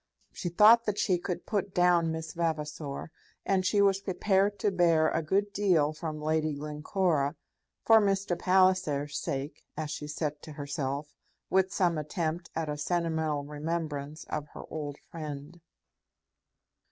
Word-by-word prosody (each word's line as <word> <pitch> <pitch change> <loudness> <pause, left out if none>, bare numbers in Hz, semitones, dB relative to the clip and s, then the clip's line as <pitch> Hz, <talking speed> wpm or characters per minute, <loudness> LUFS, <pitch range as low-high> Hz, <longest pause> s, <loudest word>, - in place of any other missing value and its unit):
She 175 - -4
thought 220 +6 +7
that 210 -1 -1
she 190 -4 +2
could 175 0 -4
put 200 -2 -2
down 175 -2 +4
Miss 160 0 -5
Vavasor, 155 -3 -3 0.3
and 190 -1 +2
she 200 +2 +3
was 195 -1 +3
prepared 195 +1 +1
to 205 - +1
bear 165 -4 +4
a 160 - 0
good 200 +6 0
deal 170 -7 +3
from 155 -1 -5
Lady 155 0 0
Glencora 150 0 0 0.5
for 225 -1 +7
Mr. 195 -2 +1
Palliser's 180 -7 +2
sake, 140 +2 -4
as 155 -1 -3
she 150 -1 -5
said 150 0 -3
to 155 - -9
herself, 145 0 -4 0.4
with 190 +1 +3
some 175 -5 +1
attempt 160 +3 -3
at 160 -1 -1
a 150 0 -3
sentimental 160 -3 0
remembrance 150 0 -4
of 150 - -4
her - - -7
old 145 -2 -4
friend. 155 +1 -7
160 Hz, 145 wpm, -29 LUFS, 150-185 Hz, 0.5 s, thought